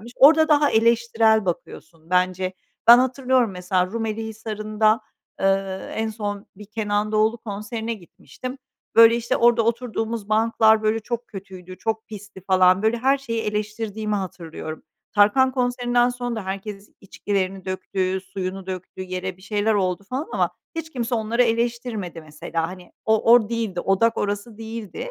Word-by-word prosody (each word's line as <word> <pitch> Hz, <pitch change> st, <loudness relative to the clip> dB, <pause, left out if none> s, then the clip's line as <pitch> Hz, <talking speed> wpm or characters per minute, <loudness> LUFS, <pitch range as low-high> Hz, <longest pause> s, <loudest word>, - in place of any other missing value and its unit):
gelmiş. 235 Hz, +3 st, -11 dB
Orada 315 Hz, +3 st, +7 dB
daha 295 Hz, -1 st, +4 dB
eleştirel 225 Hz, -1 st, +3 dB
bakıyorsun 165 Hz, -1 st, -6 dB
bence. 185 Hz, 0 st, +1 dB, 0.3 s
Ben 240 Hz, +1 st, +10 dB
hatırlıyorum 255 Hz, -2 st, +2 dB
mesela 180 Hz, 0 st, 0 dB
Rumeli 225 Hz, +1 st, -3 dB
Hisarı'nda, 215 Hz, 0 st, 0 dB, 0.4 s
eee, 195 Hz, 0 st, 0 dB
en 220 Hz, 0 st, -1 dB
son 205 Hz, -2 st, -5 dB
bir 210 Hz, -, -11 dB
Kenan 210 Hz, -1 st, -1 dB
Doğulu 220 Hz, +2 st, +2 dB
konserine 220 Hz, +2 st, -5 dB
gitmiştim. 220 Hz, -, -10 dB, 0.4 s
Böyle, 230 Hz, 0 st, +8 dB
işte, 235 Hz, 0 st, -1 dB
orada 235 Hz, -1 st, +4 dB
oturduğumuz 230 Hz, -2 st, -2 dB
banklar, 220 Hz, 0 st, +4 dB
böyle, 215 Hz, +1 st, +1 dB
çok 235 Hz, +2 st, -4 dB
kötüydü, 185 Hz, -2 st, -10 dB
çok 220 Hz, 0 st, -2 dB
pisti 205 Hz, -2 st, -10 dB
falan. 185 Hz, 0 st, +4 dB
Böyle, 220 Hz, +2 st, +2 dB
her 270 Hz, +3 st, +3 dB
şeyi 230 Hz, -4 st, -3 dB
eleştirdiğimi 210 Hz, 0 st, -3 dB
hatırlıyorum. 165 Hz, -5 st, -6 dB, 0.3 s
Tarkan 215 Hz, +6 st, +5 dB
konserinden 245 Hz, -1 st, +1 dB
sonra 245 Hz, -1 st, -4 dB
da 210 Hz, -, -4 dB
herkes 195 Hz, +1 st, -6 dB
içkilerini 195 Hz, -1 st, -3 dB
döktü, 185 Hz, 0 st, -2 dB
suyunu 190 Hz, 0 st, -6 dB
döktü 185 Hz, 0 st, -6 dB
yere, 185 Hz, 0 st, -4 dB
bir 185 Hz, -, -20 dB
şeyler 210 Hz, +1 st, 0 dB
oldu 185 Hz, -1 st, 0 dB
falan 270 Hz, +5 st, -2 dB
ama -, -, +1 dB, 0.2 s
hiç 325 Hz, -1 st, -5 dB
kimse 240 Hz, -1 st, -2 dB
onları 230 Hz, +2 st, +1 dB
eleştirmedi 230 Hz, -6 st, -2 dB
mesela. 160 Hz, +2 st, -4 dB
Hani 180 Hz, -1 st, -11 dB
o, 220 Hz, +1 st, +4 dB
od 235 Hz, -3 st, +5 dB
değildi, 225 Hz, -6 st, -2 dB
odak 225 Hz, +4 st, +2 dB
orası 205 Hz, +2 st, -3 dB
değildi. 225 Hz, -, -6 dB
215 Hz, 150 wpm, -23 LUFS, 190-230 Hz, 0.4 s, Ben